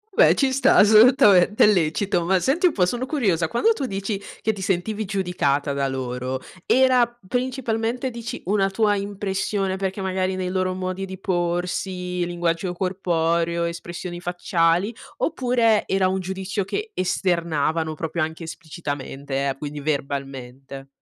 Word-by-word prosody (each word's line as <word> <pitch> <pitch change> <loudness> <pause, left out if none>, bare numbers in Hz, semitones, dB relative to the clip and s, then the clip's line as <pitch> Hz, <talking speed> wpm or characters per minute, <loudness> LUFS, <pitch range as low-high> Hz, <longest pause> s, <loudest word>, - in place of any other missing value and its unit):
beh - - +6
ci 270 -2 +2
sta 275 - +4
assolutamente, 215 -2 +6
è - - +8
lecito. 180 0 +1
Ma 185 +2 +2
senti 325 - +2
un - - 0
po' 180 -3 +3
sono 245 +7 -2
curiosa, 200 - +1
quando 440 - +2
tu 280 -11 -3
dici 195 -1 -3 0.2
che 220 - +1
ti 195 - -8
sentivi 200 +3 -1
giudicata 180 -8 0
da 140 0 0
loro, 130 0 -3 0.3
era 255 -1 +4 0.2
principalmente 245 0 -2
dici 230 -1 -6
una 195 +1 +2
tua 205 +1 +2
impressione 195 -1 -2
perché 195 +1 -3
magari 185 0 -1
nei 185 -1 -2
loro 185 0 0
modi 185 +1 -3
di 190 0 -8
porsi, 180 0 -2
linguaggio 175 0 -1
corporeo, 170 -2 0
espressioni 175 +1 -5
facciali, 175 +2 +1 0.2
oppure 240 -7 +2
era 190 -1 +2
un 190 +1 0
giudizio 190 +2 -3
che 425 - -4
esternavano, 165 - 0
proprio 165 +2 -3
anche 160 +2 -3
esplicitamente, 145 -4 -4
eh, 135 - -3
quindi 145 +1 -6
verbalmente? 135 -2 -4
185 Hz, 145 wpm, -23 LUFS, 165-205 Hz, 0.3 s, è